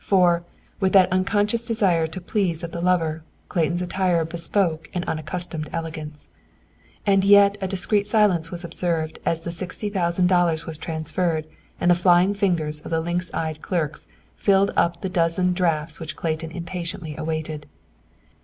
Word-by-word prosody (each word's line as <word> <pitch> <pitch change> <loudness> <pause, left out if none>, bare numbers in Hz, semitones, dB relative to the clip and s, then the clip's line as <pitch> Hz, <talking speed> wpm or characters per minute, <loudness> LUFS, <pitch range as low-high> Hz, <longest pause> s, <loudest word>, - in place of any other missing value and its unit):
For, 175 -3 +3 0.4
with 190 -2 +1
that 190 -2 +6
unconscious 205 +4 +1
desire 195 -8 +2
to 160 +4 -6
please 180 -3 -1
of 170 - -5
the 170 - -5
lover, 165 -3 +1 0.3
Clayton's 175 +1 0
attire 180 -2 +1
bespoke 165 0 -1
an 175 - -1
unaccustomed 155 0 -3
elegance. 155 -2 -6 0.8
And 195 -2 +4
yet 200 0 +6
a 190 - -1
discreet 200 +2 0
silence 205 -7 +2
was 175 +1 -7
observed 165 -2 -2
as 165 -1 +1
the 170 - -5
sixty 185 +4 -5
thousand 180 -2 +1
dollars 175 -3 +2
was 160 -2 -6
transferred, 160 0 -2 0.3
and 175 - +3
the - - +8
flying 175 +2 +4
fingers 165 -7 0
of - - -9
the 165 - +1
lynx 175 +2 -2
eyed 155 -1 -3
clerks 160 -5 -2 0.3
filled 200 0 +3
up 170 0 +1
the - - 0
dozen 180 +1 +1
drafts 165 -4 -1
which 160 0 -6
Clayton 160 0 -3
impatiently 170 -1 -5
awaited. 155 -1 -4
175 Hz, 155 wpm, -23 LUFS, 160-185 Hz, 0.8 s, the